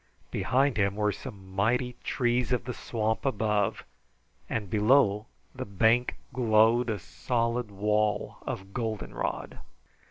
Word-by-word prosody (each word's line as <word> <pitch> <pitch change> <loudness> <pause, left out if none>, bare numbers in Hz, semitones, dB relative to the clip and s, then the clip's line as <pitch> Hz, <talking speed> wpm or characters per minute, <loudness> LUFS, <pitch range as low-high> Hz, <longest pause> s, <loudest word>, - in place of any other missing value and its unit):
Behind 135 -2 +2
him 100 -1 +2
were 105 0 +1
some 95 -1 -9
mighty 120 +5 +1
trees 120 0 +1
of 125 - +1
the 125 - -4
swamp 110 -2 -2
above, 105 -6 0 0.7
and 110 -3 -2
below 105 0 +3 0.3
the - - -5
bank 110 +5 +2 0.2
glowed 115 0 +4
a 110 - 0
solid 115 +4 -1
wall 105 +1 0
of 95 +1 -6
goldenrod. 110 -3 -3
110 Hz, 120 wpm, -28 LUFS, 105-120 Hz, 0.7 s, glowed